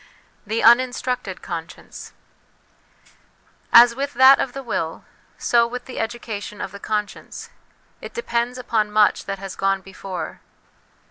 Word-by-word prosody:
The 220 +2 -1
Uninstructed 245 -3 +2
Conscience. 165 -1 -8 1.6
As 235 0 +8
with 275 +2 -4
that 260 +2 +7
of 250 - -2
the 275 - -6
will, 165 -9 -4 0.3
so 235 -1 +3
with 245 +1 -7
the 255 - -7
education 220 -3 -5
of 195 - -5
the 200 - -10
conscience; 210 -1 -5 0.5
it - - -10
depends 245 - -2
upon 220 -4 -1
much 210 0 +3
that 195 0 -4
has 195 -1 -8
gone 195 0 0
before. 190 -1 -7
230 Hz, 130 wpm, -22 LUFS, 195-245 Hz, 1.6 s, As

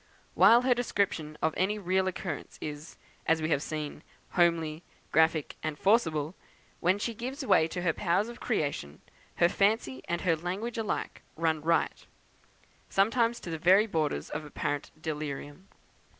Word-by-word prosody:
While 235 +2 +7
her 255 -1 +4
description 195 -10 -1
of 160 0 +2
any 200 +3 +1
real 190 -1 +1
occurrence 180 -4 -5
is, 150 +1 -7 0.3
as 165 0 +4
we 155 0 -1
have 140 - +2
seen, 150 -1 -5 0.3
homely, 165 -3 +2 0.3
graphic, 160 -1 +2
and 155 -1 -3
forcible, 165 -7 +2 0.5
when 185 +3 +3
she 230 +3 -2
gives 260 +5 -5
way 185 -8 +4
to 175 +2 -4
her 165 -3 +2
powers 185 +4 +1
of 240 +1 -9
creation, 145 - -2 0.3
her 170 - +5
fancy 195 - +1
and 170 - -1
her 170 -3 +2
language 195 +8 -4
alike 215 -3 -3
run 160 -1 0
riot, 165 +2 0 0.8
sometimes 230 +4 +2
to 170 - -6
the 160 - -3
very 190 +5 +6
borders 155 - -1
of - - -3
apparent 145 -1 -3
delirium. 150 +2 -5
170 Hz, 150 wpm, -29 LUFS, 155-205 Hz, 0.8 s, While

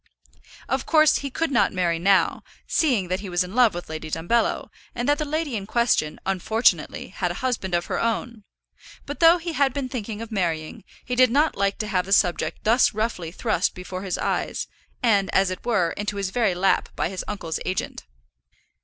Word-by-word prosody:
Of - - -2
course 310 -2 +5
he 280 - -4
could 320 +3 -2
not 245 - +3
marry 175 -3 0
now, 195 +2 +2 0.2
seeing 245 - +1
that 185 +1 -1
he 200 -1 -7
was 175 0 +1
in 180 +2 -9
love 235 -5 +4
with 175 - -6
Lady 155 0 -6
Dumbello, 175 +10 0 0.2
and 240 0 -2
that 290 +1 +2
the 305 - -1
lady 300 -3 -2
in 200 -2 -4
question, 235 -10 +1
unfortunately, 220 +5 +1
had - - -2
a - - -3
husband 195 -8 -1
of 170 - 0
her - - -2
own; 230 -1 -2 0.6
but 285 - -6
though 335 +1 +7
he 340 -1 -5
had 280 -4 +1
been 275 -3 -3
thinking 225 -4 -5
of 230 0 -7
marrying, 165 -7 -2 0.2
he 250 - -3
did 255 0 +5
not 295 +6 +2
like 200 0 0
to 215 - -3
have 185 -3 0
the 195 - +1
subject 175 -3 +1
thus 230 0 +3
roughly 215 -7 -2
thrust 200 -1 0
before 185 0 -6
his 190 -2 -3
eyes, - - -2 0.4
and, 200 -5 +3
as 190 -1 +3
it 185 - -6
were, 200 -9 +1
into 205 0 -4
his 195 -2 -2
very 220 -6 +1
lap 190 +2 +1
by - - 0
his 190 0 -5
uncle's 175 -6 -4
agent. 185 - -4
210 Hz, 200 wpm, -24 LUFS, 185-245 Hz, 0.6 s, though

